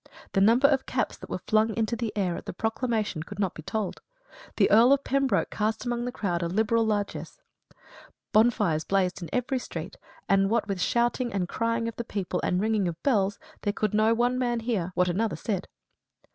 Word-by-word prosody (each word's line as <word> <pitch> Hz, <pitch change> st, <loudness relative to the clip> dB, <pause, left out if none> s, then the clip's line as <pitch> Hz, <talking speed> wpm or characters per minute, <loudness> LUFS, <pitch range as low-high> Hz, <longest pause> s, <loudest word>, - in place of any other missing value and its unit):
The 195 Hz, -, +3 dB
number 235 Hz, +7 st, +6 dB
of 275 Hz, -2 st, +1 dB
caps -, -, -1 dB
that -, -, -11 dB
were -, -, -2 dB
flung 220 Hz, 0 st, +2 dB
into 225 Hz, +1 st, 0 dB
the 230 Hz, -2 st, -3 dB
air 185 Hz, -4 st, 0 dB
at -, -, -8 dB
the -, -, -4 dB
proclamation 220 Hz, -3 st, -1 dB
could 160 Hz, -, -8 dB
not 195 Hz, -3 st, 0 dB
be -, -, -9 dB
told. 205 Hz, +4 st, -3 dB, 0.5 s
The -, -, +4 dB
Earl 235 Hz, +5 st, +7 dB
of 280 Hz, 0 st, +1 dB
Pembroke 275 Hz, 0 st, +1 dB
cast 220 Hz, +3 st, -1 dB
among 240 Hz, 0 st, -1 dB
the 245 Hz, -, -2 dB
crowd 180 Hz, -7 st, -2 dB
a 170 Hz, -, 0 dB
liberal 220 Hz, +5 st, +2 dB
largess. 205 Hz, -, -3 dB, 0.9 s
Bonfires 210 Hz, -8 st, +3 dB
blazed 190 Hz, -1 st, 0 dB
in 170 Hz, -, -6 dB
every 250 Hz, +1 st, 0 dB
street; 175 Hz, -4 st, -7 dB, 0.3 s
and 195 Hz, 0 st, +3 dB
what 225 Hz, -1 st, +1 dB
with 195 Hz, -3 st, -2 dB
shouting 240 Hz, +2 st, +1 dB
and 190 Hz, -3 st, -1 dB
crying 230 Hz, +2 st, -1 dB
of 230 Hz, -, -6 dB
the 235 Hz, -, -2 dB
people, 195 Hz, -5 st, -3 dB
and 180 Hz, -, +1 dB
ringing 215 Hz, -2 st, +1 dB
of 170 Hz, -, -2 dB
bells, 205 Hz, -7 st, +2 dB, 0.2 s
there 205 Hz, -, -1 dB
could 215 Hz, -1 st, -1 dB
no 215 Hz, +2 st, +3 dB
one 245 Hz, +2 st, +1 dB
man 240 Hz, -2 st, 0 dB
hear 210 Hz, -7 st, -1 dB
what 180 Hz, -, +3 dB
another 210 Hz, +5 st, 0 dB
said. 195 Hz, -4 st, -3 dB
215 Hz, 200 wpm, -27 LUFS, 195-235 Hz, 0.9 s, Earl